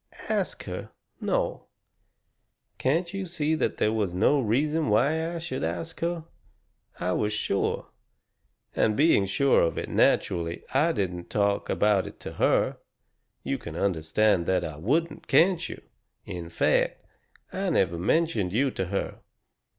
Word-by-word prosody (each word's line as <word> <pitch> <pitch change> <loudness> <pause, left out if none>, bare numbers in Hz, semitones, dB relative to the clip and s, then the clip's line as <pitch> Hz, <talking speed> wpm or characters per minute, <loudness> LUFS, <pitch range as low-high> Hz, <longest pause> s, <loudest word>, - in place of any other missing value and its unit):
"Ask - - -1
her? - - -6 0.3
No. - - -1 1.1
Can't 170 +7 0
you 195 -1 -3
see 160 -2 -1
that 160 - 0
there 105 - +2
was 100 -5 -1
no 125 +10 +3
reason 150 +7 +1
why 160 +10 +2
I - - -2
should 160 -6 -4
ask 85 0 -3
her? 170 -1 -2 0.8
I 90 +1 -1
was 105 +3 0
sure. 100 -2 -1 0.8
And 110 -1 +2
being 145 -10 +4
sure 140 +8 +3
of 85 - +1
it, - - -3
naturally 85 -1 +1
I 150 +6 +3
didn't 90 - -3
talk 100 -1 0
about 105 -2 +2
it - - -11
to - - -7
her. - - +2 0.7
You - - -2
can - - -8
understand 95 +1 +1
that 90 -1 +2
I 75 -2 -6
wouldn't, 150 - -1
can't 170 +5 +3
you? - - -7 0.5
In 85 -1 -6
fact, 85 - +1 0.5
I 195 0 -1
never 90 - +1
mentioned 105 - +1
you 130 +4 +2
to 95 - -2
her. 100 +2 -3
110 Hz, 145 wpm, -27 LUFS, -, 1.1 s, being